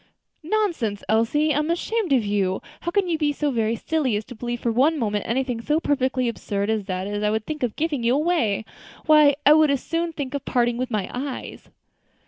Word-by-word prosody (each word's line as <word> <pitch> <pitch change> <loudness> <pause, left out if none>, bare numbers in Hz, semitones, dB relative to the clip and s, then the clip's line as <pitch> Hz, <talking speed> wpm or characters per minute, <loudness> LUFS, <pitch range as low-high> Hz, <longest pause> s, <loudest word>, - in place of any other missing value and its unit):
"Pooh! 315 - -12
nonsense, 335 - 0
Elsie! 230 +9 +2
I 285 - +1
am 305 +1 -1
ashamed 370 +2 -1
of 250 -5 +3
you! 195 -2 0 0.2
how 345 - -3
can 390 +1 +1
you 330 -3 -1
be 295 -2 +2
so 290 0 -1
very 225 -2 0
silly 285 -3 -1
as 210 +1 -3
to - - -10
believe 240 +1 -4
for 235 - 0
one 280 +8 +3
moment 210 -5 -1
anything 245 -1 -1
so 300 +6 +1
perfectly 260 -4 0
absurd 205 -2 -2
as 215 -3 -1
that 185 -1 -3
I 205 0 -1
should 220 0 -1
think 305 -1 -5
of 245 -4 -1
giving 305 -4 -1
you 235 +2 +2
away? 280 - +1 0.4
Why, 300 -2 +6
I 295 - +8
would 310 -1 +5
as 280 -2 0
soon 335 +1 -1
think 285 -4 -5
of 285 - -3
parting 240 -1 +1
with 255 0 -2
my 210 -5 -1
eyes." 260 +1 -6
260 Hz, 220 wpm, -23 LUFS, 220-305 Hz, 0.4 s, I